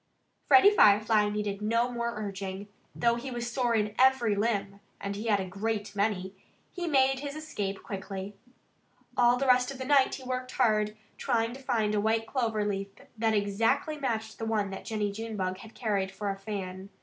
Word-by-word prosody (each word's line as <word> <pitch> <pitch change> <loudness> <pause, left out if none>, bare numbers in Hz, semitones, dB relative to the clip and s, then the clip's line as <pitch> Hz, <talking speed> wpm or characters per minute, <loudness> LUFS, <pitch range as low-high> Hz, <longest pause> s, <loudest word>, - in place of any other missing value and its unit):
Freddie 390 +1 +8
Firefly 210 - +5
needed 205 -1 -3
no 230 +3 +1
more 235 -1 -2
urging. 200 -1 -5 0.3
Though 235 0 +2
he 245 +3 -5
was 240 -1 -4
sore 240 -1 +1
in 210 -1 0
every 260 -4 +4
limb 200 -2 -1 0.2
(and 200 0 -4
he 215 +3 -5
had 205 -2 +3
a 190 - -2
great 205 +2 -3
many!) 200 -2 -1 0.4
he 350 -2 -4
made 270 -3 +3
his 285 +1 -5
escape 205 -11 -4
quickly. 195 0 -6 0.8
All 245 0 +4
the 275 - -1
rest 250 -1 +4
of 275 - -6
the 260 - -5
night 275 -1 +4
he 265 - -10
worked 255 0 -4
hard, 215 -1 +2 0.2
trying 230 0 0
to 270 - -10
find 225 -5 0
a 210 - +1
white 225 +1 +1
clover 225 -4 -1
leaf 195 -1 -2 0.3
that 220 0 +1
exactly 225 +9 +1
matched 225 -6 -3
the 225 - -3
one 210 -3 0
that 195 - -7
Jennie 210 -2 -1
Junebug 200 -4 -4
had 225 - -13
carried 200 -5 -1
for 200 +1 -3
a - - -4
fan. 195 -1 -6
220 Hz, 185 wpm, -29 LUFS, 200-245 Hz, 0.8 s, Freddie